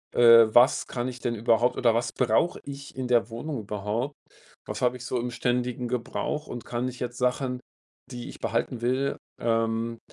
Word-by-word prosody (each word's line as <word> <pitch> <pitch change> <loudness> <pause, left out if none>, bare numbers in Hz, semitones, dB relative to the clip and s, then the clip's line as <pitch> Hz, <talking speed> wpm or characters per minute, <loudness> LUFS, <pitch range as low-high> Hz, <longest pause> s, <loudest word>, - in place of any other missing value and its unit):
äh, 115 -1 +8
was 120 +5 +5
kann 120 0 -3
ich 125 -1 -6
denn 120 -1 -2
überhaupt 115 +2 +2
oder 115 -3 +3
was 115 0 0
brauche 125 +8 +1
ich 140 0 -9
in 130 -1 -3
der 120 -3 +3
Wohnung 125 +4 -4
überhaupt? 105 +7 -3 0.5
Was - - -5
habe 125 0 +2
ich 125 - -9
so 125 - -1
im 120 +1 -2
ständigen 125 0 -1
Gebrauch 125 +5 -3
und 120 - -7
kann 120 +1 -2
ich 125 0 -7
jetzt 125 0 -4
Sachen, 125 0 0 0.5
die 120 -1 -6
ich - - -11
behalten 115 +1 -2
will, 130 +3 0 0.2
ähm, 115 0 0
120 Hz, 185 wpm, -27 LUFS, 115-125 Hz, 0.5 s, äh